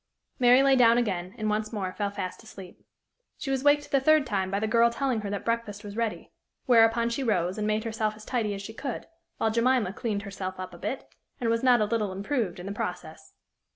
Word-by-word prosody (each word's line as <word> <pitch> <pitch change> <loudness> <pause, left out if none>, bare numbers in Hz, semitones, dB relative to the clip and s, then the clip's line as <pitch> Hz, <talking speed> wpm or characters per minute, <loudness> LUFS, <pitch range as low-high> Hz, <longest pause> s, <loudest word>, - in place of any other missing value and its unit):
Mary 250 +1 +6
lay 275 -1 +5
down 235 -2 +6
again, 190 -6 -2
and 215 - -2
once 215 0 -1
more 190 -4 -3
fell 205 -1 -2
fast 195 -2 -5
asleep. 195 -5 -12 0.5
She 270 - -4
was 265 -1 -1
waked 290 0 +3
the 275 - +4
third 310 +1 +4
time 195 -5 -1
by 200 +1 -1
the 220 - -1
girl 230 +1 +4
telling 235 -1 -1
her 205 - -4
that 200 0 -4
breakfast 230 -3 -2
was 205 -1 -8
ready; 230 -2 -3 0.3
whereupon 230 -1 +4
she 235 +4 -2
rose, 190 -5 0
and 210 - -1
made 215 0 0
herself 220 -1 -2
as 215 0 -13
tidy 220 -5 -1
as 195 - -7
she 220 - -8
could, 255 +1 -5 0.3
while 220 - +1
Jemima 230 -3 +2
cleaned 205 -2 -3
herself 190 -2 -6
up 185 -1 -6
a 175 - -11
bit, 265 - -4 0.3
and 230 -2 0
was 230 0 +1
not 250 -3 +5
a - - +3
little 210 -2 -1
improved 200 -1 -2
in 180 - -8
the 200 - -4
process. 175 -5 -6
220 Hz, 225 wpm, -27 LUFS, 200-240 Hz, 0.5 s, Mary